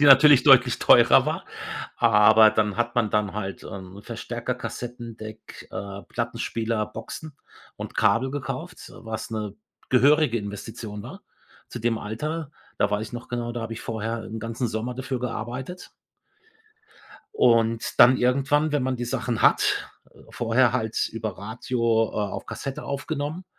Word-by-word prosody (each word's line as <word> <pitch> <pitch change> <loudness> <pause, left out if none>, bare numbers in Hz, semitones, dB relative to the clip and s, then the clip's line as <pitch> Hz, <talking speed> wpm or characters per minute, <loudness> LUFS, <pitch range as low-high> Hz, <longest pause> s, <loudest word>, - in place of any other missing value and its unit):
die 145 - +5
natürlich 140 -1 +8
deutlich 130 -3 +6
teurer - - +6
war. - - -2 0.5
Aber 110 -1 +6
dann 105 -2 0
hat 120 0 -1
man 115 -4 +1
dann 105 -3 0
halt, 100 -2 -5
ähm, 95 +1 -9
Verstärker, 120 +2 -4
Kassettendeck, 115 -2 -8
äh, 100 0 -6
Plattenspieler, 115 -2 -2
Boxen 145 +7 -8 0.4
und - - -7
Kabel 130 +3 +3
gekauft, 160 +5 -6
was 110 0 -6
'ne 105 -2 -4 0.3
gehörige 140 -1 +4
Investition 105 0 -7
war - - -10 0.5
zu 120 - -7
dem 115 0 0
Alter. 150 +8 -4 0.3
Da - - +3
weiß 105 +2 -1
ich - - -19
noch 120 -1 -7
genau, 120 -1 -3
da 120 -1 -4
habe 115 - -5
ich 115 - -6
vorher 115 0 -4
'n 110 +1 -7
ganzen 115 +2 -3
Sommer 115 +3 -3
dafür 130 0 -3
gearbeitet. 125 +8 -5 1.5
Und 115 - +2
dann 130 +1 +9
irgendwann, 140 +5 +2
wenn 145 -2 +1
man 130 0 0
die 120 - -4
Sachen 120 -1 -2
hat - - +3 0.2
äh, - - -22
vorher 120 +1 +2
halt 110 -3 -1
über 110 -4 -5
Radio, 115 +4 -4 0.3
äh, 105 -2 -2
auf 95 - -6
Kassette 135 -1 -6
aufgenommen, 145 +4 -4
115 Hz, 150 wpm, -25 LUFS, 110-130 Hz, 1.5 s, dann